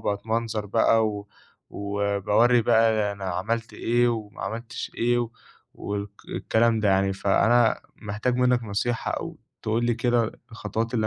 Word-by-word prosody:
باتمنظر 110 +1 -2
بقى 110 +1 +3
و 105 -1 -6 0.4
وباورّي 100 +4 +2
بقى 110 -2 +3
أنا 100 -1 -8
عملت 105 +6 -2
إيه 120 +1 +1
وما 110 -3 -4
عملتش 115 +1 -5
إيه 120 0 +1 0.5
والك 100 0 -4 0.2
الكلام 115 0 +1
ده 105 - +2
يعني. 95 0 +3
فأنا 115 +4 +3 0.2
محتاج 105 +4 -2
منّك 125 -1 +3
نصيحة 115 +3 -2
أو - - -4 0.2
تقول 115 +2 0
لي 120 0 +2
كده 120 -1 +1 0.2
الخطوات 115 +1 -3
اللي 110 -2 +1
110 Hz, 135 wpm, -25 LUFS, 100-120 Hz, 0.5 s, بقى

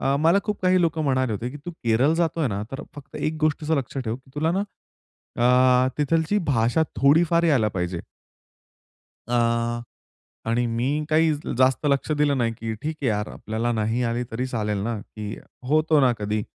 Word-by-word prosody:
अ, 135 +1 +1
मला 165 +5 +4
खूप 210 -1 -3
काही 185 0 +4
लोकं 165 -2 +1
म्हणाले 130 -4 +1
होते, 115 +4 -3
की 145 - -8
"तू - - -3
केरळ 130 -1 +1
जातोय 165 -3 0
ना, 100 0 -3
तर 135 - -5
फक्त 140 -1 -10
एक 155 +1 -2
गोष्टीच 155 0 0
लक्षात 135 -3 -1
ठेव 110 +2 -2 0.2
तुला 160 +2 +1
ना, 195 +2 0 1.2
अ, - - +1
तिथली 160 +7 +1
भाषा 120 +7 +2 0.2
थोडीफार 165 +4 +4
यायला 130 -10 +3
पाहिजे." 90 -1 -2 1.3
अ, 120 0 +1 0.7
आणि 120 +1 +1
मी 130 +6 -1
काही 160 0 +4 0.3
जास्त 130 +3 +3
लक्ष 140 +1 +1
दिलं 145 -2 +2
नाही, 115 -1 +1
की 115 -1 -5
ठीक 155 +1 -3
आहे - - 0
यार. 105 -1 -1
आपल्याला 115 +2 -2
नाही 110 +2 0
आली 120 +1 -1
तरी 125 +3 -2
चालेल 105 -4 -2
ना, 115 +1 -2
की 105 0 -7 0.3
होतो 155 0 +3
ना 130 -3 +4
कधी. 105 0 -1
130 Hz, 175 wpm, -24 LUFS, 115-155 Hz, 1.3 s, मला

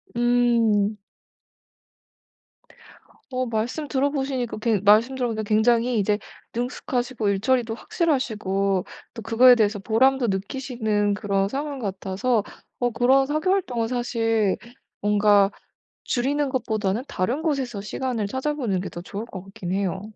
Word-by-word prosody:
음. 235 -4 +2 2.3
어 255 0 -1
말씀 235 +7 -2
들어보시니까 270 -4 -1
그 215 -3 +1
말씀 215 +5 +5
들어보니까 235 -4 -2
굉장히 230 +2 +2
이제 205 +1 +1 0.4
능숙하시고 245 -2 -2
일 195 - +1
처리도 235 0 +1
확실하시고 210 - 0 0.3
또 225 - -8
그거에 235 +4 +6
대해서 215 -3 +2
보람도 240 +5 +2
느끼시는 210 0 -1
그런 200 -1 0
상황 285 +5 -4
같아서 200 +1 -1 0.4
어 245 - +1
그런 260 +3 +3
사교 310 +6 0
활동은 245 -13 0
사실 225 -4 0 0.4
뭔가 205 -1 +4 0.5
줄이는 280 +3 0
것보다는 220 -4 -1
다른 240 +11 -1
곳에서 265 -10 -2
시간을 230 -1 -3
찾아보는 260 -5 -1
게 190 - -5
더 170 - -8
좋을 200 +4 -6
것 195 -5 -8
같긴 195 -3 -7
해요. 190 -1 -1
230 Hz, 290 characters per minute, -24 LUFS, 205-255 Hz, 2.3 s, 그거에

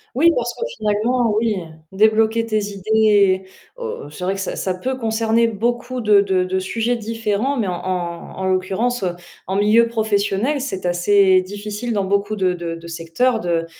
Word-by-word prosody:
Oui, 330 +6 +5
parce 240 0 -1
que - - -12 0.2
finalement, 220 +2 +1
oui, 220 -1 +1 0.4
débloquer 220 +3 +3
tes 215 -1 0
idées 200 -2 +3 0.3
o 465 - -6
c'est 150 +4 -9
vrai 185 +2 0
que 195 - -6
ça 195 - -3
ça 185 - -2
peut 255 +8 -3
concerner 225 0 +1
beaucoup 240 +3 -2
de 210 -2 +5
de 190 -2 +1
de 185 +1 -1
sujets 225 +5 -1
différents, 225 +3 -2
mais 220 -5 0
en 180 - -1
en 175 -1 -4
en 190 - -3
l'occurrence, 190 +5 0
heu, 175 -1 -1 0.3
en 190 - -2
milieu 215 +3 +4
professionnel, 220 +4 0
c'est 190 -9 -4
assez 185 +2 +4
difficile 205 +4 -5
dans 200 -2 0
beaucoup 200 +2 0
de 185 -2 +1
de 170 -1 -5
de 165 0 -11
secteurs 170 +9 0
de 170 -4 -1
210 Hz, 180 wpm, -20 LUFS, 185-230 Hz, 0.4 s, Oui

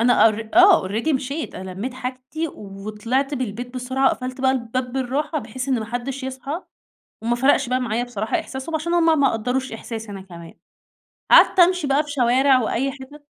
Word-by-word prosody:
أنا 240 -1 +5
أر 220 +1 -4
آه، 365 - +6
Already 225 +10 0
مشيت، 280 +4 -3
أنا 190 0 -7
لميت 215 +8 -5
حاجتي 260 +6 -5
وطلعت 215 +7 -3
من 260 - -5
البيت 245 +2 -5
بسرعة، 260 +2 0
وقفلت 255 0 -1
بقى 260 0 +3
الباب 250 0 -2
بالراحة، 275 +4 -1
بحيث 250 +1 -6
إن 255 -3 +2
ما 220 - -4
حدش 245 +4 -4
يصحى، 265 +6 -5 0.6
وما 235 +1 0
فرقش 265 0 +3
بقى 255 +1 +1
معايا 240 -1 -1
بصراحة 220 -3 -2
إحساسهم، 265 +5 -7
عشان 325 +2 -1
هُم 325 -3 +4
ما 275 -2 +4
قَدَّروش 250 +4 -2
إحساسي 225 -1 -7
أنا 195 - -7
كمان. 170 -3 -12 0.8
قعدت 380 - +7
أمشي 360 -2 +4
بقى 275 +2 +2
في 295 - -10
شوارع 260 0 +3
وأي 265 +4 -1
حتت 290 +2 -13
255 Hz, 185 wpm, -22 LUFS, 230-275 Hz, 0.8 s, قعدت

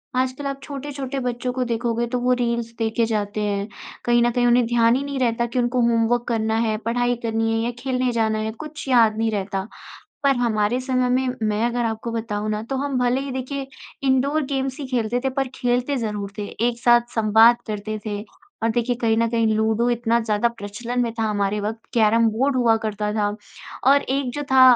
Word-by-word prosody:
आजकल 260 +2 -1
आप 275 0 -4
छोटे-छोटे 275 -1 -5
बच्चों 245 +1 -2
को 255 - -1
देखोगे, 235 0 -1
तो 250 +1 -2
वो 250 +1 +2
रील्स 235 -1 -1
देखे 225 0 +1
जाते 210 -1 -2
हैं। 205 0 -1 0.4
कहीं 240 0 +4
न 240 - +3
कहीं 245 0 +2
उन्हें 240 0 +4
ध्यान 235 0 +4
ही 275 - -1
नहीं 280 -1 -4
रहता 235 -1 +1
कि 245 +2 -2
उनको 245 +1 +1
होमवर्क 235 0 +2
करना 220 -1 0
है, 215 0 0
पढ़ाई 245 +2 0
करनी 225 0 0
है 225 - +1
या 240 - -1
खेलने 255 -1 0
जाना 220 -2 +1
है, 220 0 -2
कुछ 300 +4 -9
याद 225 -4 +4
नहीं 225 0 +1
रहता। 195 -1 -3 0.6
पर 275 -2 +4
हमारे 230 0 +1
समय 255 -1 0
में 255 +1 +2 0.2
मैं 210 +2 0
अगर 240 0 -1
आपको 225 +1 -3
बताऊँ 215 -2 -3
ना, 215 0 -2
तो 265 +4 -4
हम 275 -1 -2
भले 250 +2 +2
ही 275 0 -5
देखिए 265 +1 -4 0.4
इंडोर-गेम्स 270 0 0
ही 275 - -4
खेलते 245 -1 -1
थे 265 - +1
पर 270 0 -1
खेलते 250 +2 0
ज़रूर 210 -4 -3
थे, 210 - -2
एक 235 +1 -1
साथ 240 0 +6
संवाद 225 +2 +6
करते 215 0 -4
थे। 205 -1 -3 0.4
और 225 - +2
देखिए, 240 +2 0
कहीं 225 -2 +1
न 230 - +3
कहीं 230 -1 +2
लूडो 220 +2 +1
इतना 235 0 +1
ज़्यादा 220 +1 +1
प्रचलन 235 +2 -4
में 230 -1 -1
था - - +1
हमारे 210 -1 0
वक़्त, 220 +2 -3
कैरम-बोर्ड 230 +4 +3
हुआ 230 -3 +4
करता 210 0 -2
था, 210 -1 +1 0.6
और 280 +2 +5
एक 265 -1 -1
जो 290 - -3
था 260 -1 +7
235 Hz, 205 wpm, -22 LUFS, 220-255 Hz, 0.6 s, था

